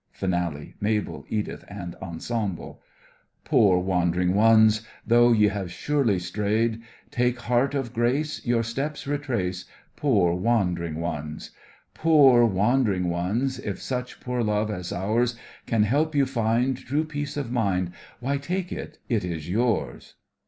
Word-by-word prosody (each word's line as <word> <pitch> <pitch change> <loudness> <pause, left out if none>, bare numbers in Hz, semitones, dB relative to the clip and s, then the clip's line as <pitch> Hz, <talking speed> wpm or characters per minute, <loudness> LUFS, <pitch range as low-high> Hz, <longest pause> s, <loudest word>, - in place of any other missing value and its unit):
FINALE—MABEL, 90 +4 -2
EDITH 105 -1 -3
and 95 -4 -7
ENSEMBLE 95 +2 -4 0.6
Poor 95 -4 +4
wandering 90 -1 +1
ones! 110 +1 +5 0.2
Though 120 +1 +5
ye 105 -2 +5
have 95 -3 -4
surely 135 -2 +1
strayed, 105 +5 -1 0.3
Take 125 0 +1
heart 125 +4 +1
of 130 -4 -3
grace, 125 +6 0
Your 120 -1 +1
steps 135 +6 -4
retrace, 120 -11 -2 0.3
Poor 100 -12 +2
wandering 90 -5 0
ones! 75 -2 -5 0.4
Poor 140 -7 +6
wandering 100 -3 +1
ones! 115 +10 -1
If 100 -6 -4
such 125 -1 -4
poor 125 -1 -2
love 105 -1 0
as 90 -4 -5
ours 115 +6 0 0.3
Can 115 -2 +2
help 150 +8 +1
you 140 -1 +4
find 120 +1 +1
True 145 +5 -1
peace 145 -1 -5
of 135 -5 -3
mind, 95 -7 0 0.3
Why, 135 +3 -1
take 180 +5 -3
it, - - -6
it 115 -6 0
is 85 -3 -4
yours! 105 - -1
110 Hz, 130 wpm, -25 LUFS, 95-125 Hz, 0.6 s, Poor